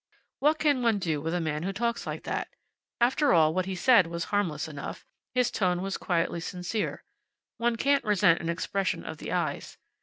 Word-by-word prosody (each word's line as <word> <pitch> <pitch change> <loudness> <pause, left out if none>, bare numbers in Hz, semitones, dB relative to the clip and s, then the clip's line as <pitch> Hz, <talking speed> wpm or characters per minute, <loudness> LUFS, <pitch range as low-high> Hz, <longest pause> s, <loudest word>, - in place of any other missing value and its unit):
What 300 +2 +3
can 290 -5 +2
one 230 -3 +3
do 160 -6 -1
with 160 +2 -2
a - - +1
man 155 -2 -2
who 190 +3 -2
talks 235 +4 -2
like - - -5
that? - - -2 0.5
After 265 +4 +3
all, 160 -2 +5
what 185 +1 -1
he 190 - -3
said 215 -1 +5
was 170 0 -3
harmless 170 -7 0
enough. 145 -3 -7 0.3
His 250 -1 +2
tone 180 -5 0
was 195 0 -2
quietly 170 -1 0
sincere. 180 +5 -3 0.5
One 235 0 +1
can't 280 +4 +2
resent 200 -5 +3
an 170 - -3
expression 190 +3 -1
of - - -7
the - - -6
eyes. - - -2
190 Hz, 190 wpm, -28 LUFS, 170-235 Hz, 0.5 s, all